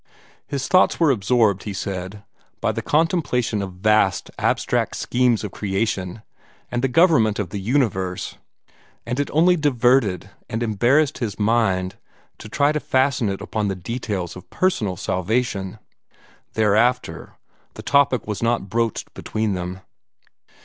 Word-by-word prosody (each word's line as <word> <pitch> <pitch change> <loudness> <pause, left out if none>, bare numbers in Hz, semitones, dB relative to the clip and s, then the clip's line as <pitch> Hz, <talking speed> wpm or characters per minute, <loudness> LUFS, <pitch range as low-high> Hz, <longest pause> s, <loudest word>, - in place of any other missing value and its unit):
His 135 -1 -3
thoughts 185 0 +4
were 165 -4 +4
absorbed, 105 -3 +2
he 105 - -5
said, 95 +1 -5 0.4
by - - +1
the - - -4
contemplation 150 - +1
of 95 -2 -5
vast, 95 -1 +2
abstract - - 0
schemes 125 -3 +1
of 105 - -4
creation 100 0 -2 0.5
and 120 - -1
the 135 - +2
government 130 - +4
of 100 -5 -3
the 100 - -4
universe, 95 -6 -1 0.7
and 120 +3 -3
it 145 - -1
only 175 +4 +4
diverted 125 - +2 0.2
and 115 +2 -2
embarrassed 125 +7 +2
his 110 -6 -3
mind 100 -4 +1 0.4
to - - -10
try 145 +6 +2
to 150 - -1
fasten 130 -5 +1
it 95 - -4
upon 110 -3 -2
the 95 - -1
details 95 -3 -4
of 90 - -12
personal 110 - 0
salvation. 95 +1 -1 0.8
Thereafter 110 +4 +1 0.4
the - - -9
topic 140 -4 +2
was 105 -1 -4
not 115 -4 0
broached 115 +1 -2
between 110 -1 -2
them. 90 0 -5
110 Hz, 140 wpm, -22 LUFS, 95-125 Hz, 0.8 s, thoughts